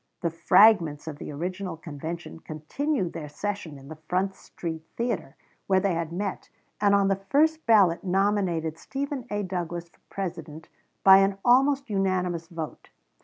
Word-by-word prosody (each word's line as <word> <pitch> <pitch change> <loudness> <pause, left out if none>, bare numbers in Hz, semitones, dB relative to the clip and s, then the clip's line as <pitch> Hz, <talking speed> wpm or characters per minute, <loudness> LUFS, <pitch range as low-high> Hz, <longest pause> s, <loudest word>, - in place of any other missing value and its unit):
The 170 -2 0
fragments 165 -2 +4
of 150 -2 -6
the - - -6
original 180 +3 -4
convention 160 +2 -7
continued 175 - -3
their 155 -3 -6
session 185 -2 -4
in 135 0 -13
the 155 +1 -10
Front 190 +2 +1
street 165 -4 -7 0.2
Theater, 235 +1 -2 0.3
where 190 -1 +4
they 190 -1 +1
had 165 -1 -2
met, 195 +2 -4 0.3
and 200 -1 +4
on 200 -1 +3
the 195 0 0
first 315 +1 +2
ballot 195 -7 +5
nominated 185 -4 0
Stephen 275 -2 -4
A. 205 0 -2
Douglas 175 -2 -4
for - - -30
President 165 -5 -6 0.3
by 190 0 +9
an 195 0 +3
almost 275 +3 +4
unanimous 180 -4 0
vote. 165 -2 -7
185 Hz, 155 wpm, -26 LUFS, 165-205 Hz, 0.3 s, by